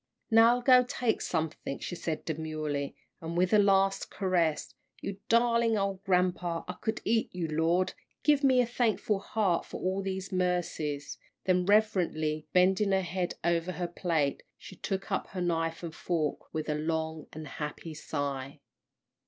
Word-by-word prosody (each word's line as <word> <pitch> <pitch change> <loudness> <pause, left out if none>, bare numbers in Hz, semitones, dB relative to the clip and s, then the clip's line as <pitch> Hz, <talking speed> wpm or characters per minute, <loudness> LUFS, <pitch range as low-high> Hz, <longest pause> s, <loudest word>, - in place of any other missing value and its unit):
"Now, 225 +2 +7
I'll 245 - -3
go 255 -1 +7
take 245 -2 -1
something," 160 -4 -2
she - - -6
said, 165 -2 -4
demurely, 155 -3 -3 0.3
and, 165 +1 -4
with 185 +3 +2
a 210 - +7
last 195 -1 +3
caress, 175 -5 0 0.3
"you 195 0 -5
darlin' 230 -1 +3
ole 195 -1 -1
grampa 180 -3 +1
I - - -3
could 220 -1 -2
eat 225 0 +2
you 175 -2 -1
Lord, 165 +4 +1 0.3
give 295 -1 +4
me 260 -2 +5
a - - +2
thankful 225 -3 0
heart 195 -4 0
for - - -8
all 190 +1 -1
these 190 0 -4
mercies," 175 -6 -1 0.2
then, 180 -1 +2
reverently 175 -7 +2
bending 190 +2 +3
her 190 - +3
head 180 0 -2
over 170 +1 +1
her 175 -1 -2
plate, 165 -5 0 0.2
she - - -11
took 195 +1 -4
up 190 - -1
her 185 - -5
knife 165 -1 -1
and 165 -2 -5
fork 160 -3 -2
with 155 -1 -3
a 150 - +1
long 160 +1 -2
and 155 -1 -8
happy 150 +3 -6
sigh. 140 -2 -4
180 Hz, 160 wpm, -30 LUFS, 160-200 Hz, 0.3 s, Now